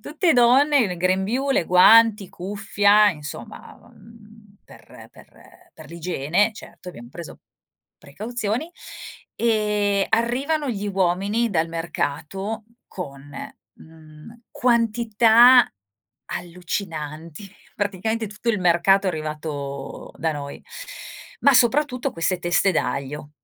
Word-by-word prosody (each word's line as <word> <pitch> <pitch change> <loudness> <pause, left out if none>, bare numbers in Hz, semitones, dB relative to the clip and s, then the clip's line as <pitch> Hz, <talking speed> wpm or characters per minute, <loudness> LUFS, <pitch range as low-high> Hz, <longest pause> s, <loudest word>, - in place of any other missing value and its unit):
tutte 330 +3 0
donne, 265 +4 +4
il 190 -8 0
grembiule, 190 +8 0
guanti, 205 +3 +5
cuffia, 205 +2 +2
insomma, 155 +7 -10 0.2
mhmm, 215 -2 -19
per - - -16
per - - -20
per - - -13
l'igiene, 170 +4 0
certo, 185 - -12
abbiam 120 -9 -11
preso 165 +5 -10 0.6
precauzioni 220 - -4 0.6
e 210 -3 0
arrivano 270 +6 0
gli 205 -2 -4
uomini 195 +4 0
dal 165 -3 0
mercato 170 +6 -4 0.2
con, 140 -5 -9 0.4
mhmm, 160 +7 -16
quantità 235 +1 +4 0.6
allucinanti, 170 -1 -6 0.2
praticamente 215 +3 -2
tutto 210 +3 -3
il 210 -4 -2
mercato 180 +3 +3
è - - +2
arrivato 150 -3 -6
da 160 - 0
noi. 140 -1 -8 0.8
Ma 280 - +5
soprattutto 255 +1 +2
queste 175 +2 -1
teste 175 +2 +1
d'aglio. 140 +1 -3
200 Hz, 100 wpm, -22 LUFS, 165-230 Hz, 0.8 s, guanti